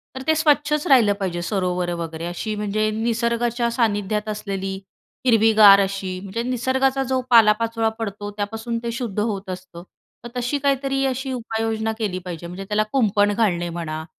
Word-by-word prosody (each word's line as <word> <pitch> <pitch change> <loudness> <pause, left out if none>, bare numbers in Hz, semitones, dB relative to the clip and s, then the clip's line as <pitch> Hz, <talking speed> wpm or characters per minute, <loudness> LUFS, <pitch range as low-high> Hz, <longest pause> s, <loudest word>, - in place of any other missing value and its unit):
तर 265 - -5
ते 315 - +4
स्वच्छच 300 -1 +2
राहिलं 235 -7 +5
पाहिजे, 175 -3 -2
सरोवरं 180 -2 -1
वगैरे, 165 0 -5
अशी 210 +5 -4
म्हणजे 210 +1 -1
निसर्गाच्या 235 +1 0
सान्निध्यात 210 -2 0
असलेली 195 -2 -4 0.5
हिरवीगार 220 -4 +7
अशी 195 -1 -3
म्हणजे 200 +4 -4
निसर्गाचा 260 +2 0
जो 255 - +1
पालापाचोळा 225 0 +4
पडतो 205 -1 -5
त्यापासून 220 +3 -4
ते 235 - -2
शुद्ध 230 -4 -4
होत 205 -3 -2
असतं. 180 -2 -8 0.4
तर 240 - -6
तशी 245 +4 -1
काहीतरी 275 0 0
अशी 265 0 -2
उपाययोजना 225 -2 -2
केली 190 -4 -2
पाहिजे. 170 -1 -6
म्हणजे 185 +3 -7
त्याला 210 +2 +1
कुंपण 205 -5 +3
घालणे 180 -6 +1
म्हणा 160 -2 -5
215 Hz, 150 wpm, -22 LUFS, 195-240 Hz, 0.5 s, हिरवीगार